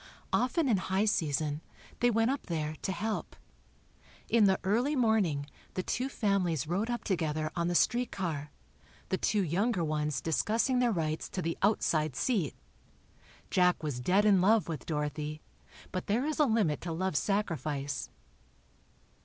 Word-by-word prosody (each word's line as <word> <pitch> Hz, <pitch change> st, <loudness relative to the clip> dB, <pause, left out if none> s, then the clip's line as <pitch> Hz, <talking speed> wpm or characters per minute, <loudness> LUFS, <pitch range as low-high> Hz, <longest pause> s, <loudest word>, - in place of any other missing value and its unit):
Often 275 Hz, +5 st, +2 dB
in 225 Hz, -6 st, +3 dB
high 190 Hz, +2 st, 0 dB
season, 155 Hz, -6 st, 0 dB, 0.4 s
they 245 Hz, -, +4 dB
went 225 Hz, +1 st, +2 dB
up 275 Hz, -, -4 dB
there, 155 Hz, -3 st, -2 dB
to -, -, -2 dB
help. 210 Hz, +4 st, -3 dB, 0.9 s
In 230 Hz, -3 st, +5 dB
the 190 Hz, -1 st, +3 dB
early 240 Hz, +10 st, +1 dB
morning, 215 Hz, -, +2 dB, 0.3 s
the 185 Hz, -, -1 dB
two 255 Hz, +7 st, -1 dB
families 190 Hz, -, 0 dB
rode 190 Hz, +8 st, -1 dB
up 240 Hz, 0 st, -2 dB
together 155 Hz, -4 st, -1 dB
on 170 Hz, 0 st, 0 dB
the 175 Hz, -, 0 dB
streetcar, 175 Hz, -11 st, 0 dB, 0.6 s
the 190 Hz, -, 0 dB
two 210 Hz, -2 st, +1 dB
younger 185 Hz, +3 st, +1 dB
ones 150 Hz, -3 st, -1 dB
discussing 220 Hz, -, +1 dB
their 245 Hz, -1 st, +3 dB
rights 160 Hz, -5 st, -2 dB
to 185 Hz, -, -3 dB
the 165 Hz, 0 st, -1 dB
"outside 155 Hz, -, +2 dB
seat." 200 Hz, -, 0 dB, 1.0 s
Jack 180 Hz, -2 st, +3 dB
was 145 Hz, -5 st, -2 dB
dead 190 Hz, +11 st, +3 dB
in 200 Hz, -3 st, +5 dB
love 215 Hz, +3 st, +4 dB
with 160 Hz, -4 st, -5 dB
Dorothy, 150 Hz, 0 st, -3 dB, 0.5 s
but 185 Hz, -1 st, -4 dB
there 230 Hz, +7 st, +1 dB
is 310 Hz, +1 st, -2 dB
a 300 Hz, -, +6 dB
limit 215 Hz, -, +1 dB
to 170 Hz, -, -4 dB
love's 165 Hz, -3 st, 0 dB
sacrifice. 145 Hz, -, -2 dB
185 Hz, 155 wpm, -31 LUFS, 155-220 Hz, 1.0 s, a